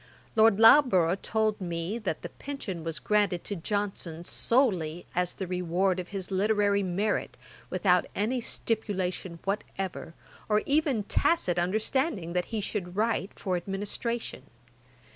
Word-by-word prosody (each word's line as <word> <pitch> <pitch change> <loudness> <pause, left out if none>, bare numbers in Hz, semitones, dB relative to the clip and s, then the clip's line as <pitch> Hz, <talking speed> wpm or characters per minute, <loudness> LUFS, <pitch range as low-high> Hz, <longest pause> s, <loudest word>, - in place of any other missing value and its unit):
Lord 220 -2 +5
Loughborough 225 - +7
told 215 +2 -1
me, 175 +4 -3
that 190 -8 -3
the - - -5
pension 215 - -6
was 165 -1 -3
granted 205 -4 +1
to 205 - -4
Johnson 185 -3 -3
solely 175 - +1
as 180 0 0
the 190 - -4
reward 180 +1 0
of 180 - -5
his 195 -1 -5
literary 200 +1 +2
merit, 195 +3 -1 0.3
without - - +2
any 240 +5 0
stipulation 190 -6 -2
whatever, 195 -4 -4 0.3
or 210 0 +3
even 280 -6 +2
tacit 190 - +2
understanding 205 - 0
that 180 -1 0
he 220 -2 -3
should 185 -3 -4
write 215 -2 0
for 185 -3 -1
administration. 205 +6 -3
195 Hz, 130 wpm, -28 LUFS, 180-220 Hz, 0.3 s, Loughborough